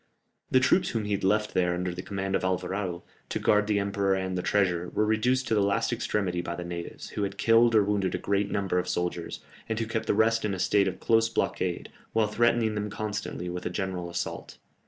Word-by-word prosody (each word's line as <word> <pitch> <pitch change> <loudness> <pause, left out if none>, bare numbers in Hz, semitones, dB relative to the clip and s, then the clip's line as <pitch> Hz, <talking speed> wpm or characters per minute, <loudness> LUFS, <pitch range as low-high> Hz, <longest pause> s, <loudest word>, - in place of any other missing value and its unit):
The 130 - +5
troops 175 +8 +3
whom 110 -3 -2
he 105 - -4
had 100 -1 -1
left 105 +2 +1
there 90 -1 +2
under 90 0 -2
the 90 - -5
command 95 0 -3
of - - 0
Alvarado, 95 -1 -2 0.3
to - - -1
guard 105 0 +3
the 105 -1 +2
emperor 100 -1 +1
and 95 -1 -2
the 90 - -1
treasure, 90 -3 +1
were 105 - +1
reduced 125 +5 +1
to - - +2
the 105 - +3
last 100 0 +1
extremity 90 -4 -1
by 85 0 -4
the 90 - -5
natives, 85 -1 -6
who - - -4
had 100 0 -2
killed 115 0 +4
or 105 - +6
wounded 100 -2 0
a - - 0
great 100 0 0
number 95 -3 0
of 90 - -3
soldiers, 90 -1 -3 0.3
and 110 0 -1
who 115 - 0
kept 110 0 -3
the - - +2
rest 115 +1 +3
in 105 -2 0
a - - -7
state 100 +1 +3
of 95 - -3
close 115 -1 +3
blockade, 90 -5 -2 0.2
while 110 -1 +3
threatening 115 +1 +2
them 105 0 -2
constantly 105 -4 -4
with 90 0 -4
a - - -2
general 90 -1 -3
assault. 85 0 -5
100 Hz, 230 wpm, -28 LUFS, 90-110 Hz, 0.3 s, or